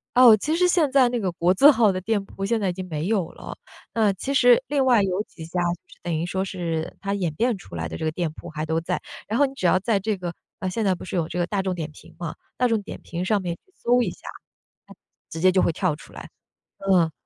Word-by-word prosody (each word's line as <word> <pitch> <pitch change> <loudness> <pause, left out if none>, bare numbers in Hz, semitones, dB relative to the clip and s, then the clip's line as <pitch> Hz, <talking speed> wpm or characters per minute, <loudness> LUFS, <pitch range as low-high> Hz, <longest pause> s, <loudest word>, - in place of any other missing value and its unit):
哦， 245 -3 +9
其 310 +9 -1
实 360 +1 +3
现 335 -5 +3
在 265 -3 +5
那 240 -1 -1
个 190 -4 -1
国 175 +2 +2
字 280 +10 +7
号 230 -7 +5
的 185 0 -3
店 205 0 0
铺 195 0 -5
现 225 +2 +1
在 195 -3 0
已 - - -2
经 185 0 -6
没 155 +1 -3
有 195 -6 0
了， - - -9 0.4
那 215 -3 +3
其 270 +9 -4
实 245 -2 +6
另 280 -1 +1
外 245 -5 +5
有 190 +1 0
几 160 -6 -11
家， 175 +2 -3 0.4
等 175 -1 -3
于 160 - -1
说 190 +2 -1
是 170 -4 -3
它 200 0 -2
演 175 -6 -1
变 235 0 +1
出 170 - -12
来 80 0 -3
的 80 - -7
这 - - -6
个 155 - 0
店 165 -1 -2
铺 175 - -10
还 155 0 -4
都 160 +1 0
在。 - - -2 0.3
然 220 +3 -1
后 285 - +6
你 270 - -5
只 190 - -5
要 185 - +4
在 205 0 +1
这 210 0 -1
个 175 -1 -5 0.3
啊， 185 - -3
现 215 +4 -1
在 190 -2 +2
不 - - -10
是 185 - -5
有 165 -2 0
这 175 - -5
个 175 - +1
大 195 +1 -1
众 185 -1 -2
点 160 -3 -5
评 - - -16
嘛， 170 -3 -5 0.2
大 250 - +3
众 225 -3 +1
点 200 - -8
评 175 +1 -4
上 205 +1 +1
面 175 -2 -3
去 - - -27 0.2
搜 245 +1 +3
一 205 - 0
下， - - -12 1.0
直 165 - -7
接 185 +1 +5
就 185 - +3
会 - - +2
跳 170 -1 0
出 - - -14
来， - - -9 0.6
嗯。 170 -3 +4
190 Hz, 290 characters per minute, -24 LUFS, 170-225 Hz, 1.0 s, 哦